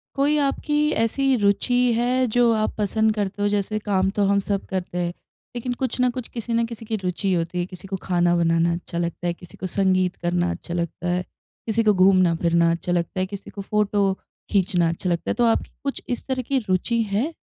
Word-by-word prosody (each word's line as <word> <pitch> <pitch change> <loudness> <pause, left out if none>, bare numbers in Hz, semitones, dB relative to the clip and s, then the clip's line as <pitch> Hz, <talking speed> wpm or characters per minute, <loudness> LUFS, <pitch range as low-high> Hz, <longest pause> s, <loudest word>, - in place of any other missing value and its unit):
कोई 285 +2 +2
आपकी 290 +1 0 0.3
ऐसी 270 +4 +2
रुचि 205 +4 +2 0.2
है 250 +2 +2
जो 240 -1 +5
आप 215 0 -1
पसंद 220 +1 +2
करते 205 -1 -2
हों, 205 - +3
जैसे 205 +1 -1
काम 195 -3 +1
तो 205 - +3
हम 200 0 +3
सब 200 0 -2
करते 180 -2 -4
हैं, 175 -1 -1 0.4
लेकिन 245 +1 -2
कुछ 255 0 -3
ना 250 0 +4
कुछ, 245 -1 -5
किसी 235 0 -5
ना 230 0 +2
किसी 230 -1 -8
की 220 - -2
रुचि 190 0 -1
होती 170 +1 -1
है। 175 - 0
किसी 185 +1 -10
को 195 - -3
खाना 175 -1 +2
बनाना 165 0 +2
अच्छा 170 0 -6
लगता 170 0 -2
है, 175 - 0
किसी 175 +1 -14
को 185 - -4
संगीत 185 -1 +1
करना 175 0 +1
अच्छा 170 - -6
लगता 170 0 -3
है, 180 +1 +1 0.5
किसी 225 +1 +1
को 210 -1 +4
घूमना-फिरना 170 -3 +4
अच्छा 170 +1 -2
लगता 175 +1 -1
है, 185 - +1
किसी 200 - -7
को 200 - -7
फ़ोटो 205 -1 +1 0.4
खींचना 180 -4 +2
अच्छा 170 +2 -3
लगता 170 -1 -1
है, - - +2
तो 240 - +2
आपकी 230 - +1
कुछ 275 -1 -3
इस 245 - -3
तरह 260 -1 -1
की 275 - +3
रुचि 230 +6 +1
है? 245 +12 0
195 Hz, 215 wpm, -23 LUFS, 175-230 Hz, 0.5 s, जो